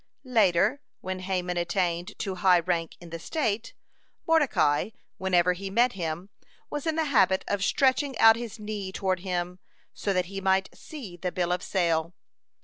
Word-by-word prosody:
Later, 220 +1 +3 0.2
when 185 0 -4
Haman 180 -1 -2
attained 175 0 -1
to 195 -3 -3
high 185 -1 +4
rank 170 -1 -1
in 170 -1 -12
the 165 - -5
state, 230 - -2 0.5
Mordecai, 270 - +2 0.3
whenever 180 -1 +3
he 195 +2 -6
met 235 +5 +3
him, 170 0 -4 0.4
was 295 +1 -4
in 320 - +1
the 320 - +1
habit 190 -9 +3
of 200 -1 -1
stretching 270 +2 +2
out 225 0 +8
his 230 -1 -6
knee 210 -3 -5
toward 190 -1 -1
him, 180 -1 -3 0.3
so 200 - -2
that 180 -2 +1
he 195 +2 -6
might 190 0 +1
see 235 - -9
the 180 +1 -3
bill 175 -1 -1
of 180 0 0
sale. 170 -3 0
190 Hz, 165 wpm, -27 LUFS, 175-220 Hz, 0.5 s, out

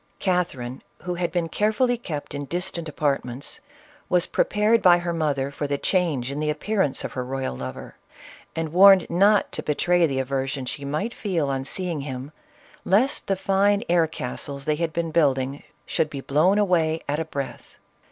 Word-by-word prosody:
Catherine, 165 -10 -1 0.2
who 180 0 -2
had 175 0 -2
been 175 -2 0
carefully 220 +7 +1
kept 155 -14 -6
in 145 0 -4
distant 175 0 -3
apartments, 140 - -2 0.5
was 180 -1 +3
prepared 215 +2 +2
by 175 -1 +7
her 175 0 -3
mother 140 -4 -1
for 145 +1 -3
the 140 0 -1
change 150 -8 0
in 140 - -4
the 155 0 0
appearance 155 0 0
of - - -5
her 130 - -3
royal 130 - -3
lover, 65 0 -7 0.6
and 160 -1 -3
warned 190 0 +8
not 200 +4 +4
to - - -3
betray 175 +3 +2
the 135 -3 -3
aversion 135 0 -2
she 140 +3 -5
might 155 +12 -2
feel 170 -9 -1
on 135 -1 -2
seeing 175 -2 -3
him, 135 0 -6 0.5
lest 225 +9 +2
the 195 - +2
fine 200 +2 +2
air 170 -2 +4
castles 140 -3 -4
they 155 - +2
had 165 0 -1
been 165 0 -2
building 140 -3 +1 0.2
should 155 - 0
be 140 -3 -6
blown 155 +9 +3
away 165 -6 +2
at 145 +2 -1
a 160 - -2
breath. 140 -3 -6
160 Hz, 175 wpm, -24 LUFS, 140-180 Hz, 0.6 s, warned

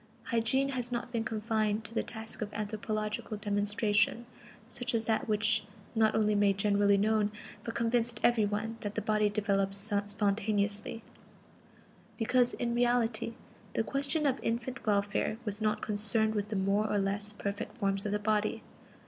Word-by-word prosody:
Hygiene 265 +4 +1
has 250 -2 +1
not 240 0 -3
been 230 -2 -1
confined 220 -1 0
to 225 - -9
the - - +1
task 225 0 -8
of 210 -1 -3
anthropological 215 0 -3
demonstration, 205 +2 +1 0.4
such 245 +1 -3
as 225 -1 0
that 225 +4 0
which 215 +1 +2 0.3
not 220 -2 +3
only 215 -1 +3
made 205 -1 +3
generally 200 0 +3
known, 210 0 +2 0.3
but 230 - -5
convinced 235 -1 +1
every 240 -2 +4
one, 210 +2 -2
that 205 -1 -5
the - - 0
body 215 -1 +2
develops 200 0 0
spontaneously; 205 +1 -1 1.1
because, 245 +1 +2
in 235 -1 -1
reality, 235 -1 +1 0.4
the - - +2
question 280 +5 0
of 270 -2 +2
infant 240 +3 -2
welfare 205 +1 +1
was 210 0 +1
not 215 -1 0
concerned 220 +1 +2
with 205 -1 -1
the 210 - -4
more 200 +2 +1
or 210 - +2
less 200 +1 -1
perfect 205 +2 -5
forms 195 -3 0
of 210 - -2
the 210 - +2
body. 210 0 0
215 Hz, 155 wpm, -31 LUFS, 205-230 Hz, 1.1 s, every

